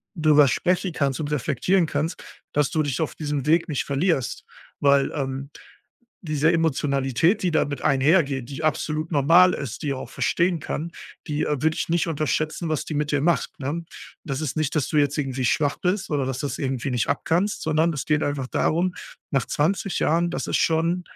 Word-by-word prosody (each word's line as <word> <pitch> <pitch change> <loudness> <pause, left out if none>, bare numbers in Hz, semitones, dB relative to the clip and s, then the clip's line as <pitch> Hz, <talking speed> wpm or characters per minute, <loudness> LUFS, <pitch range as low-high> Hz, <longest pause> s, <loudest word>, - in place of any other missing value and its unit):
drüber 155 -3 +5
sprechen 180 +5 0
kannst 140 -3 -1
und 150 -1 -3
reflektieren 155 +7 +1
kannst, 150 +3 -3 0.3
dass 145 -2 +1
du 155 - +1
dich 145 0 -2
auf 160 - -2
diesem 145 -3 -3
Weg 165 +2 +3
nicht 145 - -1
verlierst, 140 -1 -1 0.3
weil, 140 -1 +3
ähm, 135 -1 -4 0.8
diese 155 0 +2
Emotionalität, 145 - +1
die 180 - +1
damit 145 -2 0
einhergeht, 140 -2 +2
die 140 +3 -6
absolut 155 +1 -1
normal 165 +6 +5
ist, 130 -5 -6
die 145 - -1
auch 130 - -7
verstehen 170 +4 0
kann, 165 +3 -4 0.3
die, 150 -1 -1
äh, 150 -3 -1
würde 160 0 +2
ich - - -2
nicht 170 0 +1
unterschätzen, 155 +1 -1
was 155 -3 -1
die 155 - -5
mit 150 0 -1
dir 145 - +2
macht, 170 +2 0
ne? 150 +5 -3 0.4
Das 140 -3 -3
ist 155 -2 -3
nicht, 155 0 -1
dass 150 - +1
du 155 - +1
jetzt 145 +1 +1
irgendwie 135 -2 -2
schwach 145 +4 +1
bist 185 +2 -1
oder 145 -3 0
dass 130 -1 -3
du's 145 - -3
irgendwie 135 0 -2
nicht 125 -3 0
abkannst, 170 +8 0
sondern 160 +2 +2
es 150 -3 -4
geht 150 -1 +2
einfach 145 -2 -2
darum, 175 +7 0 0.4
nach 135 -2 +1
20 180 +4 0
Jahren, 170 +2 +2
das - - -3
ist - - +1
schon 165 +2 +1
150 Hz, 190 wpm, -24 LUFS, 140-165 Hz, 0.8 s, drüber